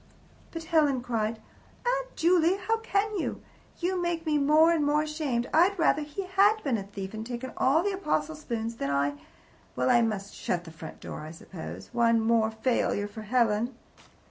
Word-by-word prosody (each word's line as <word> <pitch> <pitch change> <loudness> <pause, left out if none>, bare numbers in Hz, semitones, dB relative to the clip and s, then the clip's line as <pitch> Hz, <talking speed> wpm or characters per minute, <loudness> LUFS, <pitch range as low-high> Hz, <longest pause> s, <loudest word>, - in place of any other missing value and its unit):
But 330 -1 -6
Helen 305 -6 +2
cried: 230 -2 -1 0.5
"Aunt - - -1
Juley, 345 +1 +3
how 440 +4 0
can 425 -1 -1
you! - - -3 0.4
You 360 +1 -1
make 345 -1 -2
me 300 -2 +2
more 305 +4 +5
and 325 -3 +2
more 295 +1 +2
ashamed. 300 -6 -2
I'd 360 +5 +4
rather 320 -2 +3
he 300 +7 -5
HAD 395 +3 +3
been 270 -5 +1
a - - -4
thief 195 0 -7
and 220 0 -5
taken 245 +2 -5
all 300 +6 +3
the 405 - 0
apostle 315 -5 -1
spoons 230 -6 -4
than 140 - -2
that 140 - 0
I 140 +1 +1 0.6
Well, 125 0 +2
I 240 - +5
must 210 -3 -2
shut 175 -1 -2
the 165 - -11
front 160 0 -10
door, - - -7
I 155 - -7
suppose. 165 +1 -9
One 230 -1 +3
more 225 0 +3
failure 220 -2 0
for 210 +2 -9
Helen." 230 +1 +1
270 Hz, 190 wpm, -28 LUFS, 220-335 Hz, 0.6 s, more